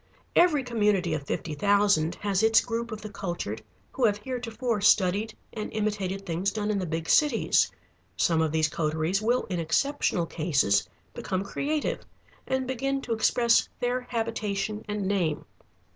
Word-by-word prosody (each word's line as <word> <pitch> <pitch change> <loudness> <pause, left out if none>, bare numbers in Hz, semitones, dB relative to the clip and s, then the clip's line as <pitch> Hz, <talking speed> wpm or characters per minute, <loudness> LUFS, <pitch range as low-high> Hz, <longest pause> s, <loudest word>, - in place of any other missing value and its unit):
Every 315 -6 +4
community 210 -8 +1
of 145 -2 -4
fifty 160 - -3
thousand 200 -2 +2
has 200 -2 0
its 225 0 +6
group 235 0 -3
of 215 -1 -6
the 215 - -7
cultured 170 - -4 0.3
who 260 - -3
have 205 -2 +2
heretofore 235 -1 -3
studied 205 +2 +3 0.2
and 215 -1 -5
imitated 200 -2 -2
things 180 +2 0
done 210 0 -2
in 205 - 0
the 185 - -3
big 165 0 -3
cities. 295 -7 +3 0.5
Some 165 -2 +2
of 160 -2 +1
these 160 -1 +2
coteries 160 +5 -1
will 240 +3 +1
in 180 -3 -3
exceptional 175 - +1
cases 150 - +1 0.2
become 185 0 -3
creative 295 +9 -2 0.4
and 260 0 0
begin 270 +2 -1
to 235 - -2
express 235 +1 +3
their 245 +1 0
habitation 215 -2 -2
and 210 -2 -2
name. 175 -7 0
205 Hz, 155 wpm, -27 LUFS, 175-230 Hz, 0.5 s, its